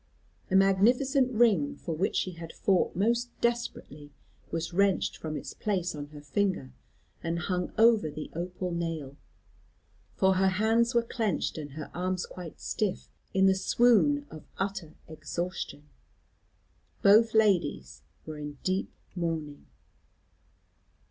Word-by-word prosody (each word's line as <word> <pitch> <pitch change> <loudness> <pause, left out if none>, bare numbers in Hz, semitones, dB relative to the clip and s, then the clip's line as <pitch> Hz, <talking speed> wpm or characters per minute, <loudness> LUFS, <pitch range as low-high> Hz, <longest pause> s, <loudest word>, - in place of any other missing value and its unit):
A 190 - +1
magnificent 245 +8 +4
ring, 215 - +3
for 165 - -5
which 185 +6 0
she 185 - 0
had 165 -1 -9
fought 190 -3 +1
most 235 +6 +1
desperately, 235 -11 -2 0.4
was 165 +1 -3
wrenched 200 +1 +2
from 155 -1 -5
its - - -7
place 185 -4 -1
on 145 -1 -6
her 150 0 -12
finger 180 -2 -1 0.5
and 165 +1 -1
hung 180 0 -2
over 225 -6 +5
the 150 +1 -7
opal 180 +2 -4
nail, 165 -5 -3 1.0
for 190 0 +3
her 190 +1 +4
hands 225 +5 +2
were 235 - +4
clenched, 225 -6 -1
and 145 -2 -7
her 155 +1 -7
arms 185 +1 -2
quite 180 -3 -10
stiff, 205 -4 -2 0.2
in 190 0 +5
the 190 - +6
swoon 245 +8 +3
of 155 - -11
utter 195 -5 -3
exhaustion. 155 0 -5 1.2
Both 220 +3 +6
ladies 190 - +2 0.2
were 155 -1 -7
in 145 -1 -7
deep 185 +1 -1 0.2
mourning. 160 -4 -3
185 Hz, 130 wpm, -29 LUFS, 160-215 Hz, 1.2 s, the